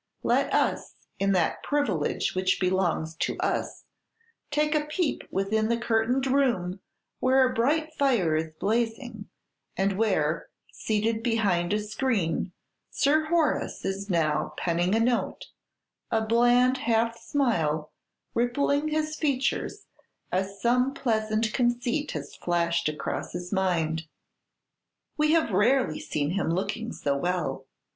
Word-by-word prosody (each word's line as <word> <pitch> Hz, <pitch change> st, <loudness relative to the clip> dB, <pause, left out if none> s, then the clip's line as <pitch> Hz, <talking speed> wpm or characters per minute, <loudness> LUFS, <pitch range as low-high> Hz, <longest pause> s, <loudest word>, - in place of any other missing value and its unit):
Let -, -, +2 dB
us, -, -, 0 dB, 0.2 s
in 195 Hz, 0 st, +2 dB
that 175 Hz, -3 st, +1 dB
privilege 230 Hz, -, 0 dB
which 185 Hz, 0 st, +1 dB
belongs 180 Hz, -4 st, 0 dB
to -, -, -1 dB
us, -, -, -2 dB, 0.7 s
take 300 Hz, +1 st, +1 dB
a 300 Hz, -1 st, +1 dB
peep 305 Hz, +1 st, -1 dB
within 215 Hz, +3 st, 0 dB
the 235 Hz, -, +2 dB
curtained 235 Hz, +3 st, +1 dB
room, 240 Hz, -10 st, +1 dB, 0.4 s
where 260 Hz, 0 st, +4 dB
a 255 Hz, -, -3 dB
bright 310 Hz, +7 st, +1 dB
fire 235 Hz, -, +2 dB
is 160 Hz, 0 st, -2 dB
blazing, 225 Hz, -, -2 dB, 0.5 s
and 195 Hz, +1 st, 0 dB
where, 165 Hz, -8 st, +1 dB, 0.2 s
seated 220 Hz, +1 st, -1 dB
behind 205 Hz, -7 st, +1 dB
a 210 Hz, -, +2 dB
screen, 210 Hz, -5 st, -1 dB, 0.4 s
Sir 310 Hz, +3 st, +2 dB
Horace 320 Hz, -2 st, 0 dB
is 195 Hz, +1 st, -3 dB
now 160 Hz, -4 st, 0 dB
penning 175 Hz, +3 st, +1 dB
a -, -, +3 dB
note; 240 Hz, +1 st, 0 dB, 0.6 s
a 220 Hz, -1 st, +1 dB
bland 245 Hz, +3 st, +4 dB
half 230 Hz, -1 st, +1 dB
smile 160 Hz, -, 0 dB, 0.4 s
rippling 280 Hz, +5 st, +1 dB
his 310 Hz, 0 st, -1 dB
features 300 Hz, +7 st, -1 dB, 0.5 s
as 195 Hz, +2 st, -2 dB
some 250 Hz, +4 st, +2 dB
pleasant 220 Hz, -2 st, 0 dB
conceit 245 Hz, +3 st, 0 dB
has 145 Hz, -2 st, -6 dB
flashed 170 Hz, -2 st, 0 dB
across 150 Hz, -, -4 dB
his 180 Hz, +2 st, -5 dB
mind. 165 Hz, -4 st, 0 dB, 1.1 s
We 305 Hz, +1 st, +2 dB
have 325 Hz, -8 st, +2 dB
rarely 205 Hz, -, +2 dB
seen 145 Hz, 0 st, -2 dB
him 195 Hz, -2 st, -1 dB
looking 200 Hz, +6 st, -2 dB
so 140 Hz, -1 st, -1 dB
well. 140 Hz, -4 st, -2 dB
220 Hz, 125 wpm, -27 LUFS, 180-255 Hz, 1.1 s, where